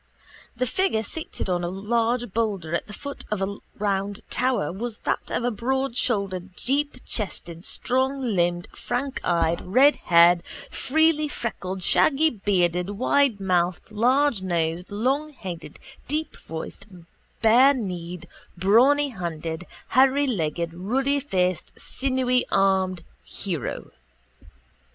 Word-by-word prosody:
The 250 +1 0
figure 250 - 0
seated 315 +3 -5
on 175 -1 0
a 175 - -1
large 230 +3 -1
boulder 200 -8 -1
at 170 - -1
the - - -10
foot 280 +6 -7
of 210 - -1
a 195 +1 -2 0.2
round 200 0 -1
tower 250 - +1
was 215 +4 -4
that - - -1
of - - -1
a 245 - +1
broadshouldered 220 -6 -1
deepchested 240 - -2
stronglimbed 245 -10 +1
frankeyed 175 -11 -1
redhaired 180 -7 +5 0.3
freelyfreckled 290 - 0
shaggybearded 195 - +2
widemouthed 195 -10 +1
largenosed 190 - +1
longheaded 245 - -3 0.3
deepvoiced 185 - -6 0.4
barekneed 220 - +3 0.3
brawnyhanded 190 - +2 0.3
hairylegged 235 - +2
ruddyfaced 205 - 0
sinewyarmed 195 -9 +1 0.2
hero. 170 - -4
205 Hz, 85 wpm, -24 LUFS, 180-260 Hz, 0.4 s, redhaired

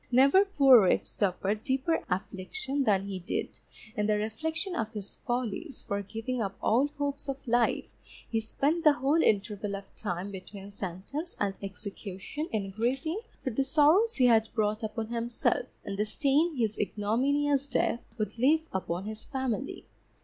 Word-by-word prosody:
Never 275 +10 +6
poor 275 - +7
wretch 185 - +3
suffered 200 +2 -1
deeper 270 +4 0
affliction 260 - -2
than 195 -3 +3
he 195 -2 -4
did, 180 - -4 0.4
in 210 0 0
the 210 -1 +3
reflection 315 - -2
of 220 -7 -2
his 205 -2 -7
follies, 245 +5 -3
for 200 0 -2
giving 225 +5 -4
up 195 -2 -3
all 250 +6 +3
hopes 285 -1 -4
of 270 - -2
life, 240 0 +2 0.4
he 225 - 0
spent 285 +9 0
the 305 -3 +7
whole 285 +5 +2
interval 205 -2 +1
of 195 0 -10
time 190 -1 -4
between 195 +1 -9
sentence 200 - -5
and 200 -1 0
execution 200 - -6
in 200 -3 -2
grieving 260 - -1 0.2
for 260 - -1
the 270 +5 +1
sorrows 315 - +4
he 255 - +4
had 225 -2 +5
brought 215 0 +1
upon 220 0 -3
himself 235 - 0 0.2
and 195 0 -4
the 210 - +2
stain 290 +8 +2
his 220 -4 0
ignominious 270 +8 +1
death 245 -2 +1 0.2
would 215 +1 -3
leave 315 +6 +3
upon 185 0 -2
his 215 0 -6
family. 265 -2 -3
230 Hz, 160 wpm, -29 LUFS, 205-280 Hz, 0.4 s, poor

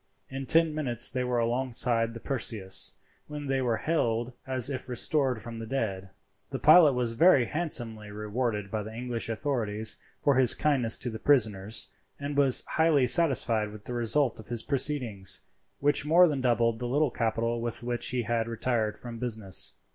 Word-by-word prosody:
In 135 0 -6
ten 165 -1 +3
minutes 125 -6 +1
they 125 0 -2
were 125 -1 -1
alongside 120 -1 0
the - - -7
Perseus, 110 -7 0 0.3
when 150 -1 -7
they 135 -1 -1
were 120 -3 0
hailed 120 -6 -1
as 130 -2 +2
if 130 -2 -6
restored 130 0 0
from 115 +2 -9
the 115 - -7
dead. 100 -7 -3 0.4
The - - -4
pilot 160 -6 +6
was 125 -2 -1
very 140 -1 +4
handsomely 120 -9 -2
rewarded 105 -1 -3
by 110 - -2
the 110 +1 -8
English 120 -1 -4
authorities 110 -3 -1 0.2
for 140 -2 +2
his 125 -3 +4
kindness 130 -7 +1
to 125 - -4
the 110 - -7
prisoners, 110 -7 0 0.3
and 145 0 -5
was 140 -3 +5
highly 160 -5 +2
satisfied 120 -8 +4
with 105 -1 -13
the 125 - -6
result 120 +2 0
of 110 - -12
his 120 -2 -4
proceedings, 125 -8 0 0.4
which 145 0 +2
more 170 +4 +5
than 145 -4 -2
doubled 115 -2 +1
the 125 - -3
little 140 +2 +1
capital 115 +1 -2
with 120 0 -4
which 120 0 -3
he 125 -1 -2
had 115 0 -1
retired 115 -2 -2
from 120 -2 -9
business. 110 -6 -3
120 Hz, 175 wpm, -27 LUFS, 115-135 Hz, 0.4 s, pilot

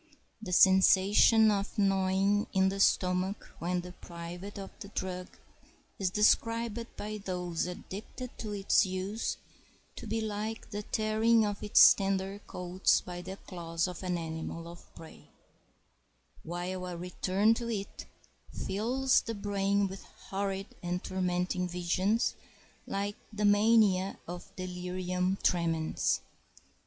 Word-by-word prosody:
The 195 -5 -6
sensation 195 +4 +6
of 200 +2 -2
gnawing 195 +1 +2
in 190 -1 +4
the 195 +1 -4
stomach 185 +1 +1
when 180 +1 -1
deprived 175 +2 -9
of 195 -1 -7
the - - -8
drug 185 -2 -4 0.7
is 190 -2 +1
described 230 +3 +2
by 215 +1 -5
those 180 -3 -3
addicted 210 +7 -8
to 215 - -5
its 200 -1 +3
use 190 +3 -3 0.6
to - - -7
be 225 +2 -1
like 220 +1 -4
the 205 0 -3
tearing 220 +2 +2
of 205 -1 -3
its 210 - +8
tender 195 0 -2
coats 180 +1 +1
by 175 0 -7
the 190 +2 -7
claws 170 -2 -3
of 180 -2 -7
an 180 -2 -1
animal 165 0 -5
of 170 0 -13
prey, 160 -1 -13 1.1
while 180 +2 -4
a 175 -1 -5
return 185 +4 +1
to 235 0 -4
it 200 -3 -5 0.4
fills 250 +7 +1
the 230 - -5
brain 200 0 0
with 190 0 -8 0.3
horrid 195 0 -2 0.2
and 180 0 -3
tormenting 180 0 -1
visions 180 +5 0 0.5
like 200 +1 -2
the 210 -1 -1
mania 205 -2 +4
of 175 +3 -8
delirium 180 0 -2
tremens. 165 -2 +1
190 Hz, 125 wpm, -31 LUFS, 180-205 Hz, 1.1 s, its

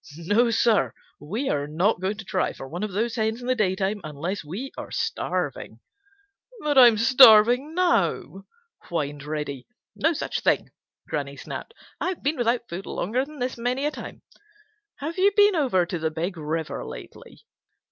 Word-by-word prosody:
No, 205 +8 +2
Sir, 220 - +2 0.2
we 215 - -4
are 145 0 -1
not 175 +7 +1
going 195 +3 -1
to 215 - -8
try - - -1
for 135 - -9
one 170 +7 -6
of 210 -1 -3
those 220 +4 -1
hens 220 +1 0
in 245 - -9
the 255 - +2
daytime 200 -2 0
unless 155 +6 -4
we 200 - -6
are - - -7
starving." - - -3 0.9
"I'm 255 -6 +7
starving 250 +4 +6
now," 195 - 0 0.4
whined 145 -4 -3
Reddy. 150 -3 -5 0.3
"No 320 +3 +2
such - - -3
thing!" - - +1 0.4
Granny - - -4
snapped. 455 - -8 0.2
"I've 370 -1 -3
been 290 +3 0
without 240 0 0
food 185 +3 -7
longer 240 +8 -1
than 305 +1 -13
this 250 -2 -3
many 250 +4 -1
a 300 - +1
time. - - -9 0.7
Have 320 +6 -5
you 395 +2 +4
been 410 -1 +6
over 250 - +2
to 175 0 -4
the 160 0 0
Big 170 +4 -3
River 160 0 -3
lately?" - - -11
215 Hz, 165 wpm, -25 LUFS, 170-255 Hz, 0.9 s, I'm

